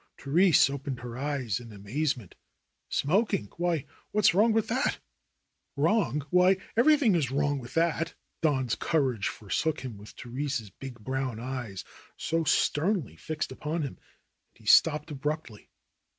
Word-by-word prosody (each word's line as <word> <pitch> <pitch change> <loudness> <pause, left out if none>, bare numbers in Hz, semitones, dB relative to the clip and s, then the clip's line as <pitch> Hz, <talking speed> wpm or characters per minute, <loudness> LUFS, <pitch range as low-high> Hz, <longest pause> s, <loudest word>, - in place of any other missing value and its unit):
Therese 165 +6 +4
opened 140 -2 -5
her 120 -2 -7
eyes 130 -6 -2
in 120 -2 -11
amazement. 115 - -3 0.6
"Smoking! 170 - +1
Why, 170 -4 0 0.2
what's 210 -4 +4
wrong 215 +5 +4
with 220 -1 +1
that 260 +5 0 0.4
?" - - -51
"Wrong! 150 - +1
Why, 180 +1 +5 0.2
everything 260 -2 +5
is 155 -8 +1
wrong 145 +1 0
with 120 +4 -8
it." 165 0 +1 0.3
Don's 130 -7 +1
courage 130 -10 0
forsook 150 +9 -2
him 120 -6 -7
with 105 - -11
Therese's 125 -3 -4
big 130 +3 -9
brown 130 -1 -2
eyes 120 -6 -5 0.3
so 165 +1 0
sternly 155 - +1
fixed 155 - -4
upon 155 +2 -3
him, 140 - -6 0.5
and - - -46
he - - -20
stopped 150 0 +5
abruptly. 145 -5 -4
145 Hz, 140 wpm, -28 LUFS, 125-165 Hz, 0.6 s, Why